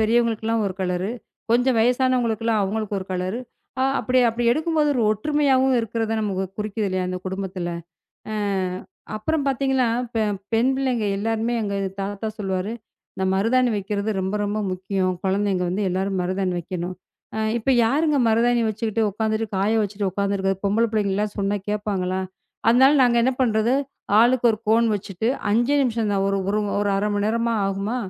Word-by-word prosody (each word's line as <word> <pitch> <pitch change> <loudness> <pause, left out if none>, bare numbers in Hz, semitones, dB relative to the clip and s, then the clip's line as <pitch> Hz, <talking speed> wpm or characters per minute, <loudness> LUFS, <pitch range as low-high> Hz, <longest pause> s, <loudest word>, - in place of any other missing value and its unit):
பெரியவர்களுக்கு 225 0 +2
எல்லாம் 225 -1 +1
ஒரு 185 - -3
கலர், 180 +1 -1 0.4
கொஞ்சம் 245 +1 +3
வயதானவர்களுக்கெல்லாம் 230 -2 +2
அவர்களுக்கு 210 +1 -2
ஒரு 185 - -7
கலர், 185 +4 -2 0.4
அ - - +3 0.2
அப்படி, 255 0 +1
அப்படி 235 +1 -2
எடுக்கும்போது 310 +1 +1
ஒரு 245 - +1
ஒற்றுமையாகவும் 265 +2 +2
இருக்கிறதை 225 0 -2
நமக்கு 195 -3 -1
குறிக்கிறது 210 0 -2
இல்லையா? 185 -1 -1
அந்த 185 0 -3
குடும்பத்துல 185 -2 -4 0.6
அ - - -2 0.8
அப்புறம் 285 +7 -1
பார்த்தீங்கன்னா 265 -1 +1 0.3
பெ 225 - +1 0.3
பெண் 230 +3 +3
பிள்ளைகள் 245 -7 0
எல்லாருமே 225 +2 -1
எங்கள் 200 -1 -2
தாத்தா 200 +2 -4
சொல்லுவாரு, 195 0 -2 0.4
இந்த 190 - -2
மருதாணி 240 +6 +2
வைக்கிறது 205 +1 -2
ரொம்ப 190 +2 -2
ரொம்ப 205 +1 -2
முக்கியம், 185 0 -1
குழந்தைகள் 190 -2 +1
வந்து 195 +4 -1
எல்லாரும் 190 +1 -1
மருதாணி 185 +1 -1
வைக்கணும். 175 +1 -4 0.4
அ - - -2 0.2
இப்போ 250 +4 +1
யாருங்க 295 +6 +2
மருதாணி 235 +1 +3
வச்சிக்கிட்டு 220 +1 -1
உட்கார்ந்துகிட்டு, 220 +1 -2
காய 200 +3 +2
வைத்துவிட்டு 205 -1 -1
உட்கார்ந்துக்கிட்டு 200 -1 -1
இருக்கிறது? 195 +1 -4
பொம்பளை 225 +4 +2
பிள்ளைகளெல்லாம் 210 -1 0
சொன்னால் 200 0 -1
கேட்பார்களா? 195 -3 -1 0.5
அதனால் 265 +5 +6
நாங்கள் 235 -1 +4
என்ன 260 - +2
பண்ணுவது, 230 +1 +2 0.5
ஆளுக்கு 245 +1 +3
ஒரு 215 - -4
கோன் 230 +1 +4
வச்சிட்டு 195 +2 -3 0.2
5 240 +5 +2
நிமிஷம் 230 -4 0
தான். 195 0 +1
ஒரு 195 0 0 0.4
ஒரு 205 0 +1
1/2 205 +2 0
மணி 205 0 0
நேரமா 230 +1 0
ஆகுமா? 195 +4 -2
215 Hz, 155 wpm, -23 LUFS, 195-235 Hz, 0.8 s, அதனால்